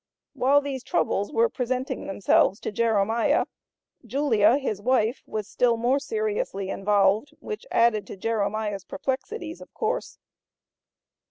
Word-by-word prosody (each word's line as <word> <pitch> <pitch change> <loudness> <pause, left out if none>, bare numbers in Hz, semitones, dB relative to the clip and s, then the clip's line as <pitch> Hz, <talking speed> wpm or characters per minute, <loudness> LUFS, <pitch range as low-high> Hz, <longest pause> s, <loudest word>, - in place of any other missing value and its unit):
While 280 +3 +4
these 275 -2 -4
troubles 205 -4 0
were 460 +8 +3
presenting 255 - -3
themselves 195 0 +2
to - - -3
Jeremiah, 225 0 +2 0.6
Julia, 235 -2 +3
his 215 -8 -3
wife, 245 0 +1
was 215 -2 -4
still 235 +1 +2
more 245 +4 +2
seriously 430 - -2
involved, 205 +7 +2
which 440 +3 -7
added 230 -3 +2
to - - -8
Jeremiah's 210 -1 -1
perplexities, 325 - -4
of - - -12
course. 480 +2 -2
235 Hz, 120 wpm, -25 LUFS, 210-285 Hz, 0.6 s, While